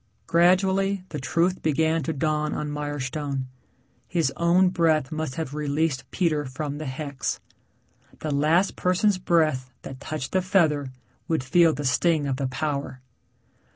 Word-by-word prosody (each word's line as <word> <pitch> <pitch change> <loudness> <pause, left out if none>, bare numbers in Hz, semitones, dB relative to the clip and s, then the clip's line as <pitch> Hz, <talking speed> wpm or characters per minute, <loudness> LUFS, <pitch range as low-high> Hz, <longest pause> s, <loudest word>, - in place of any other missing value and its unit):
Gradually 190 +3 +3
the 150 - -5
truth 165 +8 0
began 160 +1 +1
to 145 - -2
dawn 150 0 -1
on 150 -1 -3
Mirestone. 145 -1 -3 0.6
His 165 -7 0
own 175 +3 +4
breath 160 -5 +1
must 155 -4 -3
have 160 -4 -4
released 150 -2 -1
Peter 160 -5 0
from 145 +2 -5
the 155 - -5
hex. 140 0 -3 0.8
The 155 - -4
last 160 +7 +2
person's 185 +2 +2
breath 155 -8 +1
that 130 -1 -8
touched 140 -2 -5
the 185 - +2
feather 155 -8 +2 0.4
would 160 -6 0
feel 165 +5 +4
the 145 - -4
sting 155 +3 +2
of 135 -2 -1
the 135 -1 -1
power. 140 0 -3
155 Hz, 145 wpm, -25 LUFS, 140-170 Hz, 0.8 s, own